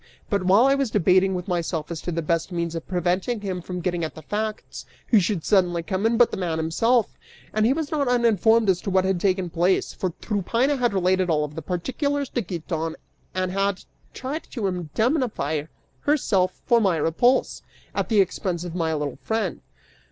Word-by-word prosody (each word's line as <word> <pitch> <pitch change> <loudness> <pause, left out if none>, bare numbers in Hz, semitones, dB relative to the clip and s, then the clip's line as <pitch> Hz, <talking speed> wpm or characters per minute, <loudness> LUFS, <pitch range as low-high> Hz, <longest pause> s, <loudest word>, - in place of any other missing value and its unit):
But 200 -2 +2
while 195 +6 +5
I 275 - +5
was 275 -3 0
debating 190 -1 +3
with 180 -1 -4
myself 170 -3 -2
as 165 - -4
to 175 - -4
the 165 0 -2
best 165 +3 -1
means 170 -1 -2
of 165 -1 -6
preventing 185 +5 -1
him 185 -3 -3
from 180 +1 -5
getting 175 -1 -1
at 160 - -4
the 160 - -10
facts, 215 +4 -4 0.3
who 225 - +6
should 185 -3 -1
suddenly 180 -4 +2
come 190 +5 0
in 230 0 +1
but 240 0 +5
the - - -3
man 170 -4 -1
himself; 220 +9 +1 0.3
and 215 +1 +3
he - - +3
was 310 0 -3
not 290 -3 0
uninformed 230 -2 +3
as 185 -2 +2
to - - -3
what 190 0 +2
had 190 -2 +1
taken 185 -3 +1
place, 175 +3 +1
for 185 - -2
Tryphaena 230 +7 0
had 240 -5 +1
related 185 0 +2
all 150 -2 +2
the 150 +3 -8
particulars 270 - -2
to 240 - -1
Giton 165 -3 -4 0.4
and 185 -1 -1
had 195 0 -1 0.3
tried 280 +5 -5
to 230 -6 -2
indemnify 180 - -1 0.3
herself 195 -11 +1
for 235 -1 +4
my 190 -5 +2
repulse, 240 - +2 0.3
at - - -2
the 215 -3 +5
expense 180 -2 -2
of 175 -2 -6
my 165 -2 0
little 145 -3 -3
friend. 220 -5 -2
185 Hz, 195 wpm, -24 LUFS, 170-225 Hz, 0.4 s, who